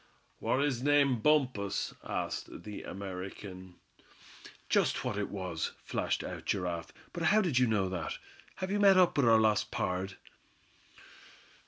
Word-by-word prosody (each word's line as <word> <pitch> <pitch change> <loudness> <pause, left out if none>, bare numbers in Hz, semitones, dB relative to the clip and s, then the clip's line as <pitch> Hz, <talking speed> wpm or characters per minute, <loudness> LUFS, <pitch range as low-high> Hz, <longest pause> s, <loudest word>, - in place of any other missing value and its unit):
"War 130 - +1
his 140 -4 0
name 140 -3 +3
Bumpus?" 125 -8 +1
asked - - -4
the 105 +1 -7
American. 95 -1 -7 0.9
"Just - - +2
what - - -1
it 105 0 -2
was," 90 -5 -3
flashed - - -1
out - - -6
Giraffe; 90 -3 -2 0.2
"but 175 - -5
how 210 +5 +4
did 170 -11 +2
you 125 - +4
know 105 -4 +1
that? 85 -5 -4 0.4
Have 185 0 -4
you 205 - +1
met 195 -2 +7
up 180 -2 +5
with 140 -4 +3
our 115 - +7
lost 110 -1 +2
pard?" 95 -5 -2
105 Hz, 145 wpm, -31 LUFS, 95-145 Hz, 0.9 s, met